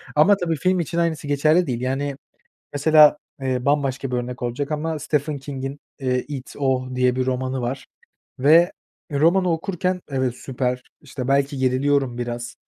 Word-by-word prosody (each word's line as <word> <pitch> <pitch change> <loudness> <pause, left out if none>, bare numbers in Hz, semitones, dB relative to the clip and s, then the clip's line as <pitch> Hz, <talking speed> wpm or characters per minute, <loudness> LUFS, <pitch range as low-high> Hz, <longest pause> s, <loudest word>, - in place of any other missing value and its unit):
Ama 190 +7 +5
tabii 170 -3 -1
film 185 +4 +1
için 170 0 -3
aynısı 165 -3 0
geçerli 155 +5 +3
değil. 120 -2 -2
Yani, 135 +2 -2 0.6
mesela, 150 +1 +6 0.2
eee, 130 -2 -1
bambaşka 135 -2 0
bir 125 - -1
örnek 125 0 -4
olacak 140 +5 -2
ama 155 +1 -2
Stephen 150 0 -1
King'in, 135 0 -6 0.2
eee, 125 -1 0
It, 135 -3 -7
O 130 -2 0
diye 125 0 +2
bir 130 0 0
romanı 130 0 -1
var 130 +2 -4 0.5
ve 160 +6 +5 0.4
romanı 170 +5 +3
okurken 180 +2 -2
evet, 130 -3 -1
süper, 125 -1 -2 0.2
işte, 130 -3 -6
belki 140 +1 +1
geriliyorum 130 -1 +1
biraz, 120 0 -4
140 Hz, 155 wpm, -22 LUFS, 130-155 Hz, 0.6 s, mesela